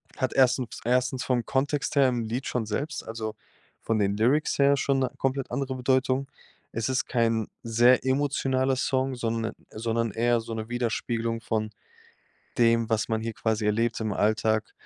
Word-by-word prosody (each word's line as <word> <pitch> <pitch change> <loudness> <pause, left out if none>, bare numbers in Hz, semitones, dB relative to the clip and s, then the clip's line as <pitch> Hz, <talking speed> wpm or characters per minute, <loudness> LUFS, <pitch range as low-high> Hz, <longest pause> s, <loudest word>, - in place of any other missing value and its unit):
hat 130 - -1
erstem 130 -1 +3 0.2
1. 125 +1 +1
vom 125 -3 0
Kontext 145 +3 -1
her 140 -2 +5
im 120 -2 0
Lied 120 +4 -3
schon 120 -3 -1
selbst 145 +9 -3
also, 110 -1 -4 0.5
von 115 - 0
den 100 -1 +1
Lyrics 130 +9 +2
her 140 0 +5
schon 135 0 +1
'ne 130 -1 +1
komplett 135 0 -1
andere 135 -2 -2
Bedeutung. 130 +1 +1 0.4
Es 115 +2 -2
ist 130 0 0
kein 115 -3 +1 0.2
sehr 120 +3 +4
emotionaler 130 -1 +1
Song, 130 0 0
sonde 115 -1 -2 0.2
sondern 115 0 -1
eher 120 +2 +2
so 115 0 -7
'ne 110 0 -5
Widerspiegelung 115 -1 -2
von 110 -1 -2 0.9
dem, 115 -1 +3
was 110 -1 0
man 110 -1 0
hier 115 0 -4
quasi 110 -1 -1
erlebt 115 +2 +1
im 110 -1 -1
Alltag. 110 +1 +1
120 Hz, 165 wpm, -27 LUFS, 110-130 Hz, 0.9 s, her